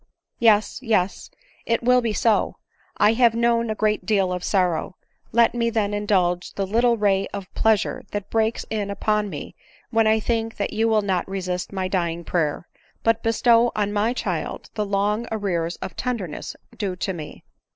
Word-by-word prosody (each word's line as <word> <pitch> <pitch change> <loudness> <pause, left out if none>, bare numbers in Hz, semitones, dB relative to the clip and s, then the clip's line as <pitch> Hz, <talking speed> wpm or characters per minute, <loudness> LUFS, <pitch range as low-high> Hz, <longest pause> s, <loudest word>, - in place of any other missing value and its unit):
Yes, 215 -2 +3
yes 210 -6 0 0.2
— - - -30
it 230 0 +1
will 250 +1 +4
be 230 -2 -1
so; 215 +1 +1 0.4
1 215 - +5
have 235 -2 +4
known 235 0 +2
a 215 - -1
great 215 0 0
deal 195 -4 +1
of 180 0 -4
sorrow 180 -2 0 0.2
— - - -47
let 235 +1 +4
me 235 -1 +1
then 210 -3 0
indulge 185 -4 0
the 195 - -2
little 235 +4 +2
ray 200 -2 +2
of 200 -2 -8
plea 220 -1 +4
sure - - -4
that 205 -1 -5
breaks 225 0 0
in 210 -2 -2
upon 210 +1 0
me 150 -6 -7 0.4
when 225 -1 +3
I 220 0 +4
think 225 0 -2
that 200 - -2
you 225 +1 +1
will 220 -2 +2
not 190 -2 -1
resist 185 -2 -3
my 190 -2 -2
dying 170 -2 -1
prayer, 165 -1 -1 0.4
but 225 0 +2
bestow 230 +1 +3
on 205 -1 0
my 210 +3 +1
child 250 - -4
the 210 -1 -2
long 205 +3 0
arrears 180 -6 -1
of - - -6
tenderness 225 -11 -4 0.2
due 195 -4 -3
to 190 +1 -2
me. 155 -4 -9
210 Hz, 185 wpm, -23 LUFS, 190-225 Hz, 0.4 s, 1